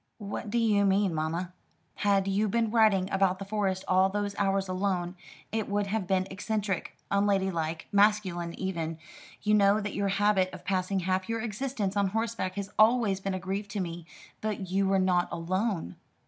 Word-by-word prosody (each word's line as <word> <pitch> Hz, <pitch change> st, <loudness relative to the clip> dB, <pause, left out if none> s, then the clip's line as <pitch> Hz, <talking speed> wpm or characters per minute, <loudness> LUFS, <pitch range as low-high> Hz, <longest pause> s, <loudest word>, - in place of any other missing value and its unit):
"What 210 Hz, 0 st, -5 dB
do 235 Hz, -, 0 dB
you 215 Hz, -3 st, +3 dB
mean, 195 Hz, -2 st, +2 dB
mamma?" 165 Hz, +3 st, -2 dB, 0.4 s
"Had 200 Hz, -1 st, +2 dB
you 200 Hz, +2 st, +1 dB
been 225 Hz, +1 st, +1 dB
riding 215 Hz, -5 st, +4 dB
about 190 Hz, -1 st, +2 dB
the 195 Hz, -, -6 dB
Forest 195 Hz, -2 st, -1 dB
all 185 Hz, +1 st, +4 dB
those 205 Hz, 0 st, -2 dB
hours 195 Hz, -1 st, +1 dB
alone, 185 Hz, -1 st, -1 dB, 0.4 s
it 220 Hz, -2 st, -2 dB
would 205 Hz, 0 st, 0 dB
have 200 Hz, -1 st, -2 dB
been 185 Hz, -1 st, +2 dB
eccentric 200 Hz, -1 st, -3 dB
unladylike 190 Hz, -5 st, 0 dB
masculine 200 Hz, -5 st, +2 dB
even. 165 Hz, -4 st, -3 dB, 0.5 s
You 210 Hz, 0 st, +2 dB
know 205 Hz, 0 st, +5 dB
that 210 Hz, -1 st, -4 dB
your 200 Hz, 0 st, 0 dB
habit 195 Hz, -1 st, +2 dB
of -, -, -10 dB
passing 190 Hz, 0 st, 0 dB
half 185 Hz, +2 st, -1 dB
your 230 Hz, 0 st, -1 dB
existence 220 Hz, -2 st, -2 dB
on 200 Hz, -1 st, +2 dB
horseback 220 Hz, -2 st, -2 dB
has 200 Hz, 0 st, -4 dB
always 215 Hz, -3 st, +4 dB
been 195 Hz, -1 st, -2 dB
a -, -, -3 dB
grief 195 Hz, +2 st, -3 dB
to 210 Hz, 0 st, -4 dB
me. 170 Hz, -2 st, -5 dB, 0.3 s
But 205 Hz, -4 st, -3 dB
you 195 Hz, +1 st, +2 dB
were 195 Hz, 0 st, +3 dB
not 185 Hz, -2 st, +2 dB
alone." 175 Hz, -, -2 dB
195 Hz, 175 wpm, -29 LUFS, 185-210 Hz, 0.5 s, know